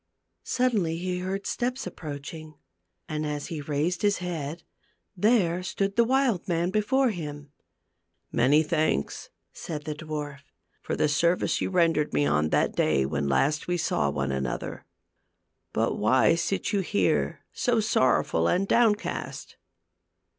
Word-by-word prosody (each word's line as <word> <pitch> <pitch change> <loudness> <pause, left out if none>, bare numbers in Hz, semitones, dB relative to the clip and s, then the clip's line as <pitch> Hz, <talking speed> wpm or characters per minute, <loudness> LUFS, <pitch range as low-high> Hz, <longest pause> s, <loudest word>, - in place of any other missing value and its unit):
Suddenly 215 -10 +1
he 180 +1 -2
heard 190 +2 -3
steps 250 +2 -2
approaching, 155 +1 -7 0.5
and 155 0 -3
as 150 -1 -3
he 160 -3 -4
raised 150 +4 -1
his 205 -1 +2
head, 170 -2 -5 0.5
there 185 -4 +2
stood 195 +3 -2
the 235 - +5
wild 250 -6 +1
man 170 0 0
before 250 +5 +2
him. 145 -5 -7 0.8
"Many 140 +6 +4
thanks," 155 - -1 0.2
said 150 -3 -6
the 150 - -3
dwarf, 150 -2 -6 0.4
"for - - -3
the 155 - +2
service 170 +4 +1
you - - 0
rendered 165 - +2
me 75 -1 +3
on 75 +1 +2
that - - +1
day 65 0 +2
when 70 0 -1
last 145 - +1
we 175 0 0
saw 75 - 0
one 70 -1 -2
another. 65 -2 -4 0.9
But - - 0
why 130 +9 +4
sit 185 +5 -1
you 200 - +2
here 200 +2 0
so 240 -3 +1
sorrowful 130 - +2
and 195 +2 +1
downcast 225 -2 0
165 Hz, 140 wpm, -27 LUFS, 145-195 Hz, 0.9 s, the